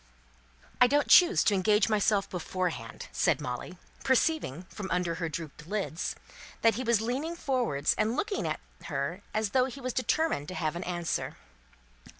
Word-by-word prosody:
"I 250 - +9
don't 290 +3 +2
choose 360 +2 +7
to 210 - +3
engage 210 +2 +3
myself 210 -2 +2
beforehand," 180 -8 -4
said - - +2
Molly, 125 +9 -5 0.3
perceiving, 260 - +1
from 190 +1 -7
under 180 -1 0
her 165 - -1
dropped 155 -1 -7
eyelids, 195 -4 -2 0.5
that 225 -1 +6
he 250 +5 -3
was 230 -3 +2
leaning 270 +9 -2
forward 250 - -1
and 220 +2 +1
looking 410 - -1
at - - -2 0.3
her - - -3
as 215 -2 -1
though 255 +2 +4
he 265 +1 -7
was 255 -2 -3
determined 255 - 0
to 185 - -6
have 155 -2 -1
an 175 - -4
answer. 175 -2 -2
210 Hz, 160 wpm, -29 LUFS, 175-255 Hz, 0.5 s, I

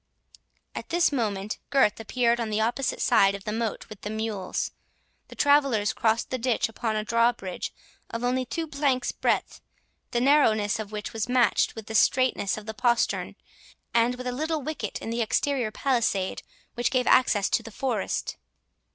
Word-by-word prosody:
At - - -7
this 345 -1 +3
moment 210 -6 -2
Gurth 270 -7 +3
appeared 235 +1 +1
on 230 -2 -2
the 210 0 0
opposite 240 +5 -1
side 195 0 +4
of 200 - -9
the 210 - -3
moat 225 0 -3
with 215 -3 -11
the 205 - -5
mules. 215 -3 -3 0.6
The - - -12
travellers 275 -8 +3
crossed 225 0 0
the 255 - -1
ditch 240 -1 +1
upon 225 0 -3
a 215 - -1
drawbridge 230 -4 0 0.4
of 230 +1 -5
only 255 +1 +1
two 325 +6 -3
planks 280 -4 0
breadth, - - -1 0.5
the 240 - 0
narrowness 225 -7 +3
of 215 -1 -6
which 210 -1 -5
was 225 +1 -3
matched 245 -3 +2
with 225 -2 -8
the 220 - -7
straitness 250 -3 +2
of 215 - -8
the 220 - -5
postern, 240 0 0 0.6
and 235 +1 +3
with 250 0 -8
a 250 - -1
little 310 +3 -2
wicket 260 -9 -4
in 225 - -4
the 235 +1 -1
exterior 245 +1 0
palisade, 225 -6 0 0.3
which 240 +1 0
gave 255 -1 +1
access 210 -6 +4
to - - +1
the - - -10
forest. 230 -2 -2
230 Hz, 175 wpm, -26 LUFS, 215-255 Hz, 0.6 s, side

